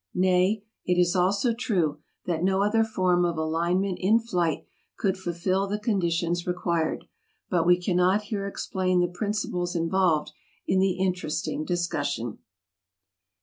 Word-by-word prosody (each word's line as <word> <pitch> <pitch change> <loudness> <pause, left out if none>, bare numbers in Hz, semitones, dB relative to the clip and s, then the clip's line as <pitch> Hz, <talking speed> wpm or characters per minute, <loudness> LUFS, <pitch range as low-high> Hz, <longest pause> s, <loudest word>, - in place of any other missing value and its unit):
Nay, 185 +3 +2 0.2
it 180 0 +1
is 175 +1 +3
also 200 +6 +2
true 180 -11 0 0.3
that 165 -2 -1
no 190 +1 +2
other 225 +2 +3
form 185 -5 +1
of 170 -2 0
alignment 170 +4 0
in 205 +5 +4
flight 180 -9 -1 0.3
could 190 -2 0
fulfill 185 +1 -1
the 205 +1 -1
conditions 175 -5 0
required; 170 -2 -1 0.5
but 170 -2 +2
we 180 0 +5
cannot 180 +3 +2
here 205 -1 -3
explain 185 -2 -1
the 175 - +3
principles 180 -2 -2
involved 165 -3 +1 0.3
in 190 - +2
the 190 -1 +3
interesting 180 -5 -2
discussion. 145 - -2
180 Hz, 135 wpm, -26 LUFS, 170-195 Hz, 0.5 s, we